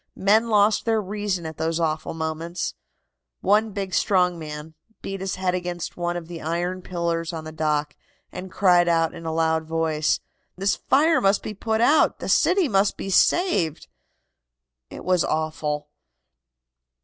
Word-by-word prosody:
Men 215 +4 +3
lost 210 0 +3
their 225 -1 +2
reason 205 -3 -3
at 160 -1 -6
those 160 +1 -1
awful 155 -1 -2
moments. 160 +2 -3 0.7
One 210 +3 +3
big, 195 -2 -5
strong 180 -3 +2
man, 150 0 -7 0.3
beat 195 0 -5
his 190 -1 -2
head 185 -1 -1
against 175 -1 -4
one 175 0 -2
of 165 -2 -7
the 170 -1 -8
iron 175 +3 -2
pillars 170 -2 -2
on 160 -2 -6
the 155 - -7
dock, 150 -1 -1 0.4
and 185 +1 -8
cried 180 -3 +4
out 165 -1 +2
in 165 - -8
a - - -1
loud 160 0 +1
voice: 160 -1 0 0.4
'This 195 +1 +1
fire 315 +4 +3
must 195 +1 +2
be 215 - -5
put 220 +2 -1
out! 295 +6 +4
The - - -6
city 365 -2 +3
must 195 -3 +2
be 195 - -4
saved!' 180 - +2 1.0
It - - -10
was 180 -2 +3
awful." 155 -1 -2
175 Hz, 160 wpm, -24 LUFS, 160-195 Hz, 1.0 s, cried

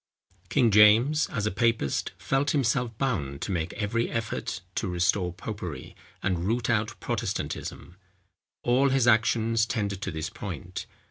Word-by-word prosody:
King 125 -6 +3
James, 110 +9 +6
as 105 -7 -2
a 105 - 0
papist, 110 - 0
felt 135 +2 0
himself 120 -3 0
bound 85 - -1
to - - -3
make 85 -2 -1
every 110 +3 -1
effort 110 -4 -3
to 105 - -2
restore 90 +1 +1
popery, 90 -7 -7 0.3
and 90 -2 0
root 115 +3 0
out 105 -1 -1
Protestantism. 85 - -4 0.7
All 130 +3 +3
his 135 -2 +2
actions 115 -1 +3
tended 100 -5 -2
to 100 - -2
this 80 -2 -4
point. - - -6
110 Hz, 140 wpm, -27 LUFS, 95-120 Hz, 0.7 s, James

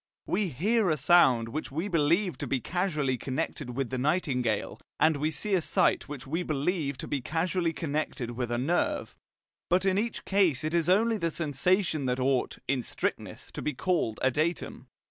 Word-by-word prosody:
We 210 - 0
hear 195 - +1
a 155 - +2
sound 130 -6 +4
which 150 +4 -4
we 165 +8 -2
believe 170 +2 +2
to 145 - -3
be 130 +1 0
causally 150 -6 -1
connected 135 -2 -4
with 135 -3 -2
the 130 - -2
nightingale, 130 - 0 0.2
and 160 -2 +4
we 150 +2 0
see 160 +7 -2
a 185 - +3
sight 155 - +2
which 145 -4 -7
we 160 +6 -2
believe 150 -2 -1
to - - -6
be 140 - -2
causally 165 +4 0
connected 150 -6 -3
with 120 0 -3
a 120 - -1
nerve. 155 +8 0 0.5
But 180 +2 +2
in 190 0 +3
each 230 +1 -3
case 185 -9 +2
it 155 +1 -2
is 170 0 +2
only 220 +4 +3
the 165 - 0
sensation 160 0 0
that 125 +1 0
ought, 130 -1 +1
in 130 0 +1
strictness, - - -4
to - - -6
be 150 - -2
called 160 - 0
a 130 - +4
datum. 155 -2 -2
155 Hz, 185 wpm, -28 LUFS, 130-180 Hz, 0.5 s, sound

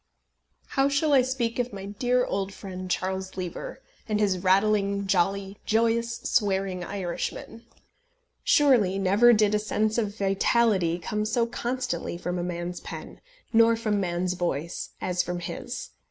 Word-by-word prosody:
How 270 +1 +2
shall 290 +2 +2
I 270 - +7
speak 250 -2 -2
of 245 0 -1
my 195 -1 -7
dear 245 +5 +1
old 195 0 -2
friend 185 -2 -7
Charles 190 +1 -2
Lever, 190 - -6 0.3
and 210 -1 +1
his 195 -3 +2
rattling, 200 +1 +2
jolly, 195 +1 0
joyous, 230 +1 +1
swearing 195 -4 0
Irishmen. 200 +5 -5 0.8
Surely 240 -10 +4
never 200 +5 +5
did 215 -2 +3
a 210 - +3
sense 215 +1 0
of 210 -2 -2
vitality 195 -3 +2
come 210 +5 -2
so 220 +2 +1
constantly 235 -8 -3
from 180 0 -3
a - - -2
man's 175 0 -4
pen, - - -9 0.3
nor 230 0 +6
from 215 -2 0
man's 180 -1 -1
voice, 170 -2 -3
as 180 -1 0
from 180 0 -3
his! 170 - -6
200 Hz, 145 wpm, -26 LUFS, 185-230 Hz, 0.8 s, I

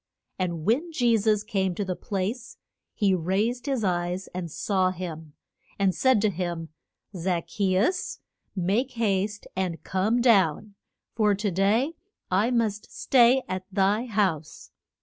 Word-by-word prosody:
And 170 -4 -2
when 290 +11 +1
Je 240 -6 +3
sus 210 -1 +2
came 190 -4 -1
to 205 - -2
the 185 -1 -2
place 210 +6 -4 0.4
he 200 -3 +2
raised 200 - 0
his 265 -5 0
eyes 180 0 -1
and 180 -2 -4
saw 185 +3 0
him, 165 -4 -7 0.4
and 195 -2 +2
said 260 0 +3
to 215 -1 +2
him, 170 -2 -4 0.5
Zac 175 -1 -1
che 190 -3 0
us, 360 - 0 0.4
make 205 +8 0
haste 205 -2 -1
and 185 -3 -2
come 205 +6 +1
down, 205 -4 +3 0.4
for 210 -2 +2
to 205 0 -1
day 210 - +2 0.4
I 200 +6 +3
must 220 -4 -1
stay 255 0 +4
at 185 0 -4
thy 205 +5 +1
house. 190 -9 -2
195 Hz, 145 wpm, -26 LUFS, 185-225 Hz, 0.5 s, stay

